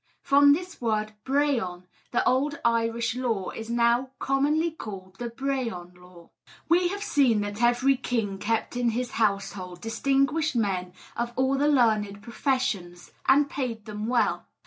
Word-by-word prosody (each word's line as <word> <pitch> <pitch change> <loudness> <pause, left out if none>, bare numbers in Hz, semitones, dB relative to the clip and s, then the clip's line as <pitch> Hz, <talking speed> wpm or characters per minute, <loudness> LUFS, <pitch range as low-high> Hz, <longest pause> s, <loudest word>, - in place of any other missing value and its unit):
From 285 0 +6
this 355 0 -5
word 215 -2 -1
'brehon,' 260 -11 0 0.3
the 240 - +1
old 280 +3 +1
Irish 230 0 +1
law 230 -7 -2
is 225 0 -7
now 235 +2 +2
commonly 295 +5 +1
called 195 -10 -9
the 240 -1 -3
'Brehon 235 -8 -3
Law.' 180 -1 -17 0.4
We 350 +1 +4
have 405 +3 -4
seen 270 - +3
that 205 +2 -4
every 245 +3 +3
king 225 -6 -2
kept 225 +3 -1
in 245 -1 +1
his 250 -1 -2
household 200 -4 -1
distinguished 275 - 0
men 185 -5 -1 0.2
of 235 0 -3
all 265 +1 +2
the 285 +2 +2
learned 215 -7 +2
professions, 230 -9 -2 0.2
and 280 +2 +5
paid 240 -7 -4
them 210 0 -5
well. 245 0 +1
235 Hz, 145 wpm, -26 LUFS, 210-275 Hz, 0.4 s, From